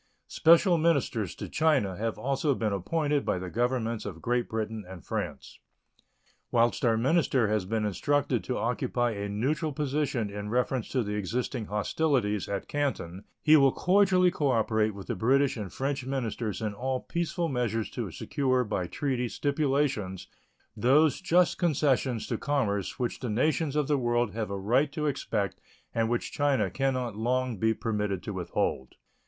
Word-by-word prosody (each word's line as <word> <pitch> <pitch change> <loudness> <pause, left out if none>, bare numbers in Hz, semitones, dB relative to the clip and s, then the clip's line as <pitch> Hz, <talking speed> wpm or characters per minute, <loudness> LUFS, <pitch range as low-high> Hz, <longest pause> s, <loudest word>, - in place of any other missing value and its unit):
Special 170 +1 +5
ministers 140 - +1
to - - -6
China 140 - +2
have 110 +3 -3
also 135 +1 0
been 110 -4 -1
appointed 145 - 0
by - - 0
the 90 0 -6
Governments 120 -2 -1
of 95 -6 -6
Great 120 +6 -1
Britain 110 -1 -3
and 90 -4 -10
France. - - -5 0.9
Whilst 120 0 +2
our 115 -2 +3
minister 135 -2 +2
has 105 -3 0
been 110 +2 -1
instructed 120 +3 0
to 125 - -2
occupy 120 0 0
a 100 -1 -4
neutral 140 +10 -1
position 140 -6 -1
in 105 +1 -5
reference 125 +1 0
to 130 -3 0
the 105 -1 -4
existing 115 +3 -2
hostilities 105 - 0
at 100 - -3
Canton, 105 -10 -3 0.2
he 155 0 +7
will 135 -3 +6
cordially 185 0 +3
cooperate 110 -7 +1
with 100 -2 -8
the - - -2
British 135 +7 +2
and 105 -5 -5
French 135 0 -2
ministers 120 -4 -3
in 105 -1 -1
all 130 +4 -2
peaceful 170 0 -2
measures 120 -6 -1
to 115 -5 -4
secure 130 - 0
by 105 -5 -2
treaty 125 +1 -2
stipulations 140 - -1 0.5
those 145 +5 +3
just 180 0 +3
concessions 135 - +1
to - - -3
commerce 105 -10 -1
which 120 -2 -2
the 125 - -4
nations 145 +6 +1
of 150 -2 +1
the 145 -2 +2
world 120 -2 +1
have 110 -1 -3
a 100 - -3
right 125 +9 +2
to 150 +1 -3
expect 110 - -2 0.3
and 115 -1 +1
which 120 0 -1
China 135 -10 +1
can 135 +4 0
not 120 -4 -3
long 125 +1 0
be 110 +2 +3
permitted 105 -4 -2
to 105 - -5
withhold. 85 -7 -2
120 Hz, 165 wpm, -28 LUFS, 105-140 Hz, 0.9 s, he